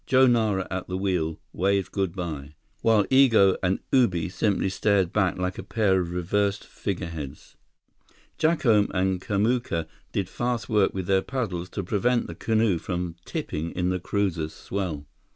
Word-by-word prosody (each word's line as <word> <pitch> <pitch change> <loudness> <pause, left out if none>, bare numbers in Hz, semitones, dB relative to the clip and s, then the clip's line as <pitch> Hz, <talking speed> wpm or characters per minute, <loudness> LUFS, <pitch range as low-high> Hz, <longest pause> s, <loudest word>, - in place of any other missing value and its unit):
Joe 130 0 +6
Nara 110 -6 +2
at 95 0 -3
the 90 - -3
wheel, 90 -5 -1
waved 95 0 +1
good 95 -3 -1
by, 75 -5 -5 0.3
while 110 -2 +4
Igo 115 -8 +6
and 95 +1 +1
Ubi 90 -11 +3
simply 100 +1 0
stared 95 -2 +1
back 95 -4 +1
like 90 0 -2
a - - -5
pair 100 -5 +2
of 85 -1 -4
reversed 100 +3 0
figureheads. 85 -8 -6 0.8
Jacome 125 -11 +3
and 95 0 +1
Kamuka 105 -5 0 0.3
did 100 -3 -1
fast 120 +3 -2
work 105 -3 +3
with 95 -2 -2
their 95 +1 +3
paddles 95 -8 -3
to 100 - -4
prevent 115 +6 +1
the - - -7
canoe 110 -5 +1
from 90 -1 -3
tipping 80 +2 -3
in 90 0 0
the 90 0 0
cruiser's 85 -5 -1
swell. 90 -7 -4
95 Hz, 155 wpm, -26 LUFS, 90-105 Hz, 0.8 s, Joe